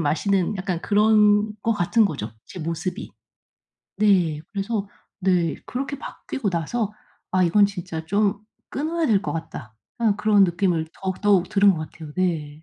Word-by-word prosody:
마시는 180 +6 +1
약간 185 -3 -3
그런 210 0 +4
것 230 - +2
같은 210 +4 +3
거죠 120 - -5
제 - - -10
모습이. 165 +3 -4 0.9
네 180 -8 +3
그래서 200 +1 -2 0.3
네 180 -4 +1
그렇게 275 +2 -4
바뀌고 215 -7 -4
나서 205 +6 -2 0.4
'아 185 0 +3
이건 200 +4 +5
진짜 180 -5 -6
좀 200 +3 +1 0.3
끊어야 320 +3 -1
될 205 -5 +3
것 - - -3
같다.' 130 -8 -7 0.3
약간 215 -3 +3
그런 210 -2 +4
느낌을 175 -2 0
더욱, 190 -1 -3
더욱 195 -4 +3
들은 200 0 +5
것 155 -3 -5
같아요. 155 -3 -10
네. 170 -5 0
195 Hz, 285 characters per minute, -23 LUFS, 165-210 Hz, 0.9 s, 이건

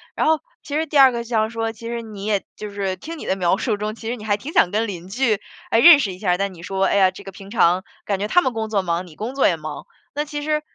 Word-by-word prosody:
然 - - +1
后 315 -1 +3 0.2
其 290 - -5
实 315 +1 +1
第 295 - -1
二 270 -2 +8
个 235 -1 -3
就 235 - -14
想 220 -2 +1
说， 225 -1 -2
其 230 +1 -10
实 235 0 -3
你 210 -3 -8
也 205 -2 0
就 210 - -6
是 195 -2 -2
听 325 - -8
你 - - -8
的 190 - 0
描 180 -1 +2
述 220 -1 -1
中， 215 +1 -3
其 225 - -6
实 240 - -1
你 215 - -10
还 205 -1 +2
挺 270 +9 -7
想 180 - +4
跟 220 +2 0
邻 180 -3 -7
居 220 0 +1 0.3
来 225 - +4
认 315 +3 +9
识 195 -8 -1
一 180 - -12
下。 180 -3 +1
但 195 0 -2
你 170 -1 -13
说， 190 +1 -1
哎 - - +1
呀， 190 -2 +5
这 195 +2 -12
个 195 - -8
平 195 +1 -12
常， 185 -4 +3 0.2
感 200 -2 -1
觉 205 - -1
他 355 - +4
们 260 - 0
工 220 -1 -3
作 205 -3 +1
忙， 175 0 -2
你 160 - -15
工 235 - -5
作 275 - +4
也 175 - +2
忙。 155 0 -7 0.3
那 295 +1 -2
其 295 -1 -5
实 305 0 0
215 Hz, 335 characters per minute, -21 LUFS, 195-240 Hz, 0.3 s, 认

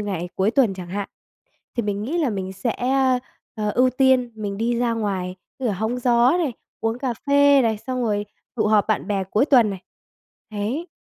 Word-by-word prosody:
ngày 190 -4 -3
cuối 190 +3 +2
tuần 230 -5 +2
chẳng 180 -2 -8
hạn, 200 +2 -4 0.7
thì 235 - +1
mình 205 -1 -2
nghĩ 295 +10 -2
là 310 -6 +1
mình 190 -3 -4
sẽ, 195 +5 -2
ơ, 260 0 +2 0.4
ờ, 210 -1 -1
ưu 255 +3 +3
tiên 255 -1 +3
mình 205 -2 -4
đi 235 +2 0
ra 240 -1 +1
ngoài, 195 -5 -2 0.2
như 260 - -1
là 215 - 0
hóng 220 +6 -2
gió 245 +5 +4
này, 310 -8 -1 0.3
uống 225 +1 -1
cà 260 -3 -1
phê 285 0 +6
này, 225 -3 +1
xong 255 +3 -3
rồi 210 -2 0 0.3
tụ 215 -3 +1
họp 210 -1 +3
bạn 215 - 0
bè 200 -2 0
cuối 210 +7 +1
tuần 245 -7 +5
này. 195 -2 -6 0.7
Đấy. 225 - -3
225 Hz, 205 wpm, -22 LUFS, 205-255 Hz, 0.7 s, phê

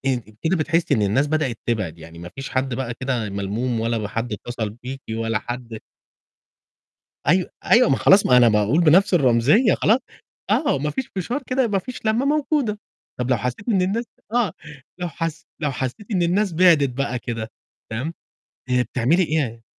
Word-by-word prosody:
أنتِ 125 -4 0 0.2
كده 170 +3 +2
بتحسّي 165 -1 +1
إن 110 - +1
الناس 110 +9 +2
بدأت 150 -6 -1
تبعِد، 105 -9 -2
يعني 85 +1 -12
ما 85 +1 -8
فيش 135 - -6
حد 130 -1 -1
بقى 120 -1 -3
كده 125 -5 -1
ملموم 105 +5 -2
ولا 115 -2 -1
حد 115 +2 -3
اتصل 110 0 -4
بيكِ 125 +5 -8
ولا 115 0 -1
حد 120 -1 -6 1.5
أيو 180 +3 +4 0.2
أيوه، 245 +1 +5
ما 135 - +4
خلاص 195 +7 +5
ما 125 - +5
أنا 120 -1 +7
باقول 105 +8 +2
بنفْس 180 +5 +5
الرمزية 140 - +4
خلاص، 220 +5 +3 0.5
آه، 290 - +2
ما 150 +2 -1
فيش 260 - -4
فشار 240 - -2
كده 255 -1 +1
ما 200 -2 +1
فيش 250 +2 -7
لمّة 225 +5 +2
موجودة، 285 -7 0 0.4
طَب 125 0 -2
لو 125 - +4
حسّيتِ 125 - -4
إن 195 -5 +3
الناس 205 +6 0 0.3
آه، 235 -8 +1 0.5
لو 180 -1 -2
حس 165 0 -5
لو 150 - 0
حسّيتِ 130 - -4
إن 185 -5 +1
الناس 185 +3 +1
بِعدِت 160 -6 +5
بقى 125 -1 -2
كده 115 -2 -5 0.4
تمام، 130 +9 -3 0.6
آآ 125 0 +3
بتعملي 130 +9 +1
إيه؟ 140 -9 -1
135 Hz, 175 wpm, -22 LUFS, 115-185 Hz, 1.5 s, أنا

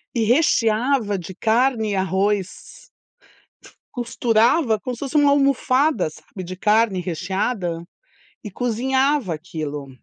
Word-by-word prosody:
e 230 - +1
recheava 230 -3 +2
de 185 +1 -8
carne 225 +1 +1
e - - -1
arroz. 195 - -2 1.0
Costurava 235 +1 +2
como 250 +4 -5
se 235 - -9
fosse 280 +1 -6
uma 290 -1 +5
almofada, 275 - +2
sabe, 185 +4 -11
de 185 +1 -8
carne 210 -1 +2
recheada 180 0 -3 0.6
e 210 - -6
cozinhava 255 - 0
aquilo. 150 -3 -6
220 Hz, 115 wpm, -21 LUFS, 190-255 Hz, 1.0 s, uma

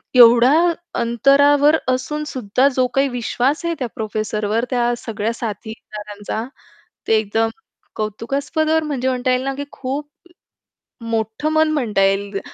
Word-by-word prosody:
एवढ्या 245 +5 +7 0.4
अंतरावर 285 +5 +4
असून 260 +4 -1
सुद्धा 255 0 +1
जो 255 -1 +2
काही 275 +1 +3
विश्वास 250 +6 -1
आहे 335 - 0
त्या 250 - -1
प्रोफेसरवर 215 +1 -2
त्या 240 -1 +1
सगळ्या 225 -1 -3
साथीदारांचा 215 -1 -6 0.6
ते - - +3
एकदम 220 +1 0 0.5
कौतुकास्पद 275 +9 -2
वर 320 0 +2
म्हणजे 270 -4 -2
म्हणता 255 0 0
येईल 255 +1 +1
ना, 275 0 -2
की 285 - -4
खूप 280 +3 -4 1.0
मोठं 225 +6 -2
मन 315 0 +3
म्हणता 230 -10 0
येईल 195 +1 0
245 Hz, 130 wpm, -20 LUFS, 220-280 Hz, 1.0 s, एवढ्या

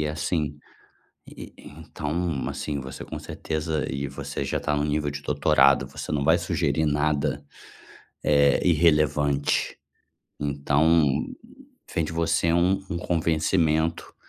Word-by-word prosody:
e 75 - 0
assim, 75 -1 -2 0.7
e - - -11
e - - -13
então, 80 -1 -4
assim, 70 -2 -4
você 65 0 -8
com - - -7
certeza, 80 -1 -3
e 70 +1 -3
você 70 0 -5
já - - -1
tá 75 - -1
no 75 - 0
nível 75 -1 -1
de 70 0 -7
doutorado, 70 -2 +3
você 70 - -7
não 70 -2 0
vai 80 +3 +4
sugerir 80 -2 0
nada, 75 -1 0 0.8
eh, 70 -2 +4
irrelevante. 75 -4 +2 0.6
Então, 75 +3 +2 0.9
vem 80 - +1
de 80 - -5
você 85 0 +1
um 85 +3 +3 0.2
um 90 - -2
convencimento. 80 -1 0
75 Hz, 130 wpm, -25 LUFS, 70-80 Hz, 0.9 s, vai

